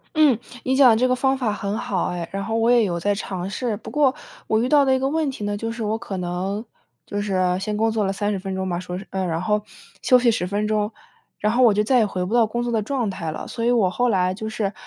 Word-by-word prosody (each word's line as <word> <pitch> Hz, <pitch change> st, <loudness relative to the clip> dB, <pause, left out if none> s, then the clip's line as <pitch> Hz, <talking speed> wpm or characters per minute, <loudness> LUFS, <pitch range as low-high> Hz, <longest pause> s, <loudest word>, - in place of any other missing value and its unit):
嗯， 295 Hz, -7 st, +5 dB, 0.3 s
你 260 Hz, +1 st, +1 dB
讲 265 Hz, -3 st, +7 dB
的 220 Hz, -, +5 dB
这 255 Hz, +3 st, +2 dB
个 255 Hz, -, +2 dB
方 265 Hz, +1 st, +1 dB
法 235 Hz, -5 st, 0 dB
很 205 Hz, +1 st, -3 dB
好 190 Hz, -5 st, -1 dB
哎， 175 Hz, -1 st, -4 dB
然 195 Hz, 0 st, -3 dB
后 225 Hz, +1 st, -2 dB
我 230 Hz, +2 st, +3 dB
也 240 Hz, -2 st, +5 dB
有 170 Hz, -4 st, -1 dB
在 205 Hz, +4 st, +1 dB
尝 190 Hz, -2 st, -4 dB
试。 230 Hz, 0 st, -2 dB
不 -, -, -10 dB
过 280 Hz, -3 st, +3 dB, 0.3 s
我 220 Hz, -, +2 dB
遇 250 Hz, -, 0 dB
到 290 Hz, -2 st, +5 dB
的 265 Hz, -, +3 dB
一 -, -, 0 dB
个 270 Hz, +1 st, 0 dB
问 315 Hz, -1 st, 0 dB
题 255 Hz, -6 st, -6 dB
呢， 205 Hz, 0 st, -1 dB
就 225 Hz, +1 st, -3 dB
是 230 Hz, -1 st, -5 dB
我 215 Hz, +1 st, -1 dB
可 195 Hz, -4 st, -6 dB
能 185 Hz, +4 st, -3 dB, 0.4 s
就 205 Hz, 0 st, -3 dB
是 200 Hz, -2 st, -2 dB, 0.2 s
先 210 Hz, +2 st, -3 dB
工 225 Hz, +1 st, +2 dB
作 215 Hz, -2 st, 0 dB
了 195 Hz, -, 0 dB
30 205 Hz, -1 st, -1 dB
分 190 Hz, 0 st, -5 dB
钟 190 Hz, 0 st, -2 dB
吧， 175 Hz, 0 st, -1 dB
说 180 Hz, 0 st, -5 dB
是 195 Hz, -, -8 dB
呃， 190 Hz, -1 st, -1 dB
然 165 Hz, 0 st, -2 dB
后 210 Hz, +2 st, +1 dB, 0.4 s
休 255 Hz, -, +5 dB
息 240 Hz, -1 st, +3 dB
10 180 Hz, -5 st, -1 dB
分 205 Hz, +2 st, -1 dB
钟， 215 Hz, 0 st, 0 dB, 0.5 s
然 210 Hz, +1 st, +1 dB
后 255 Hz, +1 st, +4 dB
我 225 Hz, -4 st, +6 dB
就 210 Hz, +1 st, +2 dB
再 250 Hz, +2 st, +3 dB
也 220 Hz, -, +4 dB
回 185 Hz, -2 st, -3 dB
不 210 Hz, -, -4 dB
到 235 Hz, -2 st, +4 dB
工 240 Hz, +2 st, -2 dB
作 240 Hz, -, -2 dB
的 220 Hz, -2 st, +1 dB
状 240 Hz, -1 st, -1 dB
态 165 Hz, -4 st, -4 dB
了。 -, -, -6 dB
所 230 Hz, -1 st, -4 dB
以 240 Hz, -, +3 dB
我 215 Hz, -7 st, +3 dB
后 245 Hz, +5 st, +1 dB
来 185 Hz, -2 st, +2 dB
就 220 Hz, +2 st, -6 dB
是 210 Hz, -2 st, -2 dB
210 Hz, 305 characters per minute, -22 LUFS, 195-240 Hz, 0.5 s, 讲